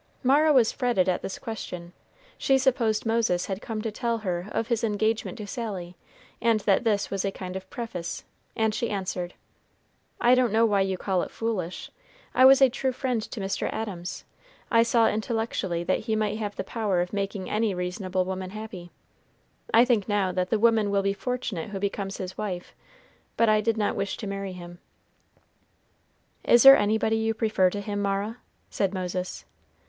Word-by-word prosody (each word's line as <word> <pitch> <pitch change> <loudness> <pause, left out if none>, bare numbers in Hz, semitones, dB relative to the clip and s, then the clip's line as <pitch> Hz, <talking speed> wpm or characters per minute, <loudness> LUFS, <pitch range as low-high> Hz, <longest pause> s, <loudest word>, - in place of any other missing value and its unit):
Mara 290 +4 +5
was 250 -6 +5
fretted 240 -8 +1
at 185 - +1
this 195 - -5
question. 180 -6 -7 0.4
She 270 - +2
supposed 240 -5 +1
Moses 225 -6 +1
had 195 +1 -4
come 215 -2 -4
to 225 - -2
tell 235 +2 -1
her 180 -4 -3
of 225 - -1
his 235 -2 0
engagement 220 +1 0
to 210 - -6
Sally, 195 -6 -5 0.5
and 230 -1 +3
that 200 +1 +2
this 210 -3 0
was 195 -1 -1
a 200 - 0
kind 185 -1 -7
of 190 0 -7
preface, 180 -8 -5 0.3
and 220 -1 +1
she 235 - -1
answered, 185 -3 -3 0.8
"I 245 - +5
don't 255 -3 +3
know 225 +2 +4
why 205 -3 +2
you 190 -1 0
call 185 -1 0
it - - -4
foolish. 200 -6 -4 0.4
I 255 - +6
was 270 +1 +8
a 265 - +7
true 260 +1 -1
friend 250 -3 -1
to 220 - -7
Mr. 195 0 -2
Adams. 190 -5 -5 0.5
I 230 -1 +6
saw 230 0 +4
intellectually 215 -6 -1
that 185 +2 +1
he 220 0 -2
might 215 0 -1
have 205 -2 -4
the - - -3
power 205 -3 -1
of 180 +2 -4
making 200 -1 -3
any 215 -2 0
reasonable 185 +1 -2
woman 185 0 -4
happy. 210 -4 -8 0.8
I 230 +2 +6
think 230 -5 +1
now 200 -3 +1
that 180 0 -1
the 220 - +2
woman 220 -1 +3
will 200 -1 +1
be 195 0 +1
fortunate 230 -6 -4
who 200 - -5
becomes 195 0 -3
his 185 0 -6
wife; 185 -4 -5 0.6
but 230 -1 +4
I 215 0 +4
did 225 +1 0
not 210 -1 0
wish 195 0 -2
to 220 - -6
marry 195 -1 -4
him." 175 -1 -10 1.6
"Is 240 - +6
there 270 0 +11
anybody 220 +1 +1
you 220 0 0
prefer 215 -5 +2
to 205 +2 -4
him, 205 0 -3
Mara?" 200 +3 -1 0.3
said 195 -1 -1
Moses. 180 0 -4
210 Hz, 185 wpm, -26 LUFS, 190-225 Hz, 1.6 s, there